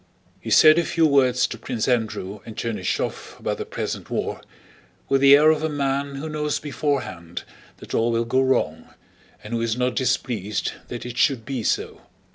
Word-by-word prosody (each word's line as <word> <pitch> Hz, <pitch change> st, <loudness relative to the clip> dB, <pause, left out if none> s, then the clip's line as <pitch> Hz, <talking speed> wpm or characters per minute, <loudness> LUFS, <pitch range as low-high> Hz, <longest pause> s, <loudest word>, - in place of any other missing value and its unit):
He -, -, -7 dB
said 155 Hz, +1 st, +7 dB
a -, -, +2 dB
few 165 Hz, 0 st, +2 dB
words 130 Hz, -4 st, +4 dB
to 115 Hz, -, -6 dB
Prince 115 Hz, -1 st, -3 dB
Andrew 110 Hz, -5 st, -1 dB
and 110 Hz, -, -10 dB
Chernýshev 105 Hz, -5 st, -3 dB
about -, -, -3 dB
the -, -, -5 dB
present -, -, -4 dB
war, -, -, -3 dB, 0.7 s
with 135 Hz, -1 st, +2 dB
the 140 Hz, 0 st, +9 dB
air 155 Hz, +2 st, +6 dB
of 155 Hz, -1 st, 0 dB
a 160 Hz, -, 0 dB
man 140 Hz, -1 st, -1 dB
who 140 Hz, +3 st, -5 dB
knows 150 Hz, -1 st, -1 dB
beforehand 135 Hz, -, -3 dB, 0.3 s
that -, -, -11 dB
all 115 Hz, +1 st, +2 dB
will 115 Hz, 0 st, 0 dB
go 130 Hz, +3 st, +2 dB
wrong, 130 Hz, -1 st, 0 dB, 0.5 s
and 105 Hz, -, -7 dB
who 115 Hz, -, 0 dB
is 115 Hz, 0 st, -1 dB
not 125 Hz, 0 st, 0 dB
displeased 115 Hz, -6 st, -1 dB, 0.2 s
that 120 Hz, -, -6 dB
it 120 Hz, -1 st, -5 dB
should 130 Hz, -6 st, +2 dB
be 135 Hz, -3 st, -3 dB
so. -, -, -1 dB
130 Hz, 185 wpm, -23 LUFS, 115-140 Hz, 0.7 s, the